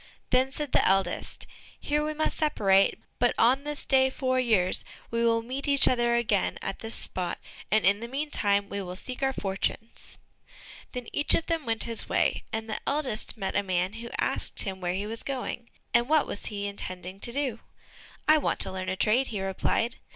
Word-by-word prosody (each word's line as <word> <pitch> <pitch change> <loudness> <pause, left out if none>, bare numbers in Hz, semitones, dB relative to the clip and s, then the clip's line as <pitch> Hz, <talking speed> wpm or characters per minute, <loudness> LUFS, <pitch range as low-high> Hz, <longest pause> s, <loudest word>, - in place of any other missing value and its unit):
Then 255 +1 +3
said 295 -1 -4
the - - +4
eldest, 195 0 0 0.3
"Here 295 +1 0
we 305 0 -2
must 310 - 0
separate, 195 -11 +3 0.2
but 245 0 +3
on 255 +4 +4
this 295 -1 -4
day 265 -1 +4
four 255 -1 0
years, 215 -7 +2 0.3
we 230 0 0
will 230 -1 +2
meet 265 +5 -4
each 280 -1 +4
other 240 -1 +2
again 215 -4 +1
at 195 - -5
this 225 0 -5
spot, 180 -2 -2 0.3
and 215 0 +3
in 200 +2 +4
the 235 - -6
meantime 230 -7 0
we 200 0 -4
will 180 -1 -6
seek 250 +7 -5
our 270 0 +2
fortunes." 205 +1 -4 0.8
Then 250 -2 -4
each 290 - +4
of 330 - -1
them 330 -6 -2
went 225 -1 +1
his 230 -1 0
way, - - +1
and 220 0 -3
the 215 - -3
eldest 270 -7 -1
met 195 -3 -3
a 205 - +3
man 185 0 -1
who 230 +1 -7
asked - - +2
him 190 -1 -5
where 175 0 -1
he 200 +2 -2
was 225 +2 -2
going, 250 -3 -4 0.2
and 240 +2 +3
what 310 -1 +5
he - - -11
was 205 - -4
intending 195 -2 -4
to 235 - +1
do? 260 -3 -2 0.7
"I 310 0 +6
want - - -1
to - - +4
learn 185 0 -4
a 185 - -1
trade," 225 +7 +2
he 210 - -4
replied. 195 +4 0
230 Hz, 200 wpm, -28 LUFS, 200-265 Hz, 0.8 s, I